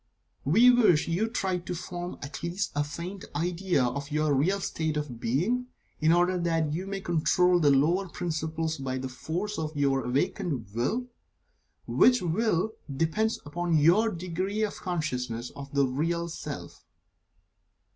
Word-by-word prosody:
We 225 - +7
wish 215 -11 +4
you 180 +7 +1
to - - -9
try 190 -6 0
to 175 +1 -5
form 175 +1 -6
at 140 - -7
least 175 +4 -2
a 145 - +2
faint 170 +6 -6
idea 175 -1 +1
of 140 +3 -2
your 155 -1 +1
Real 175 +9 +2
State 160 -4 -2
of 140 -6 -4
Being, 190 - 0 0.3
in 155 +1 +4
order 175 +1 +3
that 165 -3 0
you 180 +4 -3
may 195 0 -4
control 180 +1 +3
the 150 -3 +4
lower 165 +8 +3
principles 160 -2 -2
by 130 -1 -2
the 130 0 -3
force 175 +10 -4
of 155 -1 -4
your 135 -2 +2
awakened 140 - -1
Will, 215 - 0 0.8
which 250 0 +5
Will 185 +3 +1 0.2
depends 165 +11 0
upon 170 +2 0
your 175 +9 +5
degree 185 +3 -2
of 210 - -2
consciousness 125 -9 -3
of 140 -1 -8
the 140 -1 +3
Real 165 +6 -1
Self. 165 - -7
170 Hz, 155 wpm, -28 LUFS, 145-185 Hz, 0.8 s, We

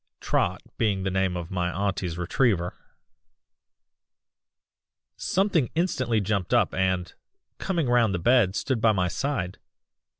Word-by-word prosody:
(Trot - - 0 0.2
being 100 -4 +1
the 95 - -1
name 95 -1 0
of 85 -1 -6
my 90 -1 -1
auntie's 95 -2 -2
retriever.) 90 0 +1 2.4
"Something 185 - +1
instantly 130 -10 +1
jumped 100 -2 0
up - - +2
and, 95 -1 0 0.5
coming 170 -7 -1
round 120 -3 +3
the 90 - 0
bed, 105 0 +3
stood 130 -2 -1
by 110 -1 +4
my 90 -3 +1
side. 100 -3 -3
100 Hz, 125 wpm, -26 LUFS, 90-125 Hz, 2.4 s, by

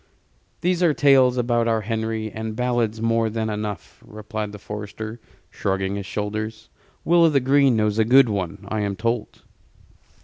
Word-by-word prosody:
"There 175 0 +2
are 150 - 0
tales 130 -3 +4
about 120 -1 +1
our 115 -1 +1
Henry, 110 0 -3
and 110 0 -5
ballads 120 -2 0
more 115 0 +2
than 110 0 -2
enough," 105 -1 -6
replied 110 0 -6
the 105 - -9
forester, 105 +2 -7 0.3
shrugging 95 0 -2
his 100 -1 -5
shoulders. 110 +1 -4 0.4
"Will 170 +1 +5
o' 165 - +6
th' 140 -4 +1
Green 135 -1 +4
knows 105 0 +1
a - - +5
good 130 +3 +6
one, 100 -1 -4
I 110 - -2
am 100 -1 -2
told." 115 +2 -3
110 Hz, 165 wpm, -23 LUFS, 105-125 Hz, 0.4 s, o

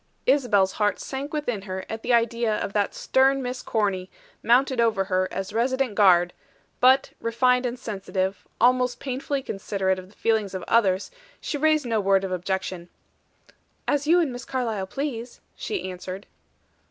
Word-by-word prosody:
Isabel's 235 -8 +3
heart 210 0 0
sank 275 +2 -5
within 245 -9 -2
her 190 -1 -6
at 220 0 -5
the - - -2
idea 230 -2 +2
of 200 - -4
that 205 -1 0
stern 270 +1 +2
Miss 250 0 -4
Corny, 195 -4 -1 0.3
mounted 255 +1 +3
over 220 -4 +2
her 185 -1 0
as 195 +1 -4
resident 255 +1 0
guard; 180 -4 +5 0.5
but, 260 +2 +5
refined 250 +2 +2
and 245 +1 -4
sensitive, 195 -4 -3
almost 250 +1 +3
painfully 270 +1 -3
considerate 195 -2 -1
of 185 0 -12
the 205 - -22
feelings 215 -4 0
of 185 - -4
others, 195 -4 +2 0.3
she - - -4
raised 310 0 +2
no 225 -2 0
word 195 -1 +3
of 190 - -3
objection. 185 -1 -3 1.0
"As 290 0 +1
you 345 +3 +5
and 320 -6 +1
Miss 245 0 -7
Carlyle 225 -7 -2
please," 245 0 -5 0.2
she 405 - -4
answered. 185 +2 -7
225 Hz, 160 wpm, -25 LUFS, 195-255 Hz, 1.0 s, guard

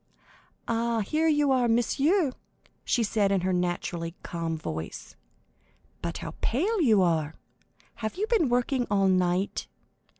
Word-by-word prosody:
"Ah, 230 0 0
here 310 +10 0
you 295 -3 +3
are, 255 -2 +3
monsieur," 275 - +2 0.5
she 240 - +1
said 205 -2 +1
in 195 -2 +2
her 185 +1 0
naturally 175 -1 -2
calm 165 -1 -3
voice; 80 - -6 0.9
"but - - -3
how - - -6
pale 375 - +1
you 220 - +5
are! 160 -3 0 0.6
Have 220 -1 -4
you 400 +4 -1
been 440 - +2
working 245 +1 +1
all 195 -1 +3
night? 185 +1 +1
220 Hz, 135 wpm, -27 LUFS, 180-270 Hz, 0.9 s, you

